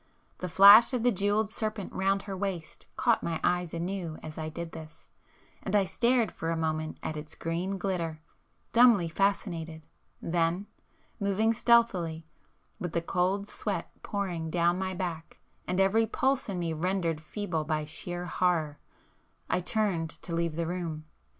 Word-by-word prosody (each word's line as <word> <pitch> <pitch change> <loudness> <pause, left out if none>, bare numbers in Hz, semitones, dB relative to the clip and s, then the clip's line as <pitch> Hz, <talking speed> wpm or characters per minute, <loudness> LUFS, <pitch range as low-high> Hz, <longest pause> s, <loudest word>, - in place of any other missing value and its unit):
The 180 - -4
flash 200 +7 +9
of 245 -3 0
the 245 - +4
jewelled 205 +1 +1
serpent 215 -3 -4
round 195 +1 +1
her 195 -2 -5
waist 185 -4 -5
caught 235 -2 +3
my 165 -1 -2
eyes 180 -2 +1
anew 170 -1 -4
as 155 -1 -7
I 155 -1 -4
did 165 +1 -6
this, 160 0 -11 0.5
and 195 - -2
I 205 - +5
stared 235 +2 +2
for 165 - -4
a 165 - 0
moment 155 -1 -2
at 155 - -3
its 150 0 -8
green 175 +4 -2
glitter, 175 -4 -2 0.5
dumbly 230 -7 +6
fascinated,—then, 165 -1 -2 0.5
moving 205 +2 +2
stealthily, 190 -9 +2 0.5
with 175 -5 -4
the 170 - +1
cold 190 +3 0
sweat - - -3
pouring 180 -5 -3
down 175 +2 +2
my 190 -1 -2
back 170 -3 -5 0.3
and 180 +1 0
every 215 +4 +3
pulse 265 +2 0
in 190 - -2
me 170 -2 -1
rendered 170 -1 -1
feeble 170 -2 -3
by 155 0 -1
sheer 175 +3 -5
horror, 170 -5 0 0.7
I - - +2
turned 180 -4 0
to 170 - -5
leave 165 -1 -1
the 170 0 -1
room. 165 -3 -4
180 Hz, 155 wpm, -29 LUFS, 165-200 Hz, 0.7 s, flash